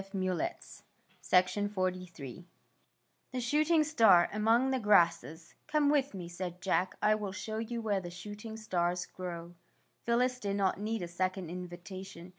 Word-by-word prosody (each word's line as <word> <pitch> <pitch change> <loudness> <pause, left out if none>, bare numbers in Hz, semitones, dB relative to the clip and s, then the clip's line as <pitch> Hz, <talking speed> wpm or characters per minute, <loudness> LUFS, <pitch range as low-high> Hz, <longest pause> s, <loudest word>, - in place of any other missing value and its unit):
THE 185 -3 -1 0.7
SHOOTING 185 +3 +3
STAR 185 -3 0 1.4
THE 255 - -2
SHOOTING 305 +6 +3
STAR 225 - +5
AMONG 225 +5 +3
THE 260 - +1
GRASSES 170 - +2
'' - - -43
Come 300 -2 +3
with 280 -6 +1
me," 180 -3 -6
said 175 0 -6
Jack. 185 0 0
" - - -41
I 215 - +5
will 210 -2 -2
show 215 +2 -4
you 230 +1 -4
where 205 -3 0
the 175 - -6
shooting 210 +4 -8
stars 180 -4 -1
grow.'' 175 -2 -7 0.5
Phyllis 250 +2 +2
did 200 -3 -2
not 195 -1 +1
need 215 -1 -2
a - - -3
second 185 0 -2
invitation. 180 0 -8
195 Hz, 155 wpm, -32 LUFS, 180-225 Hz, 1.4 s, STAR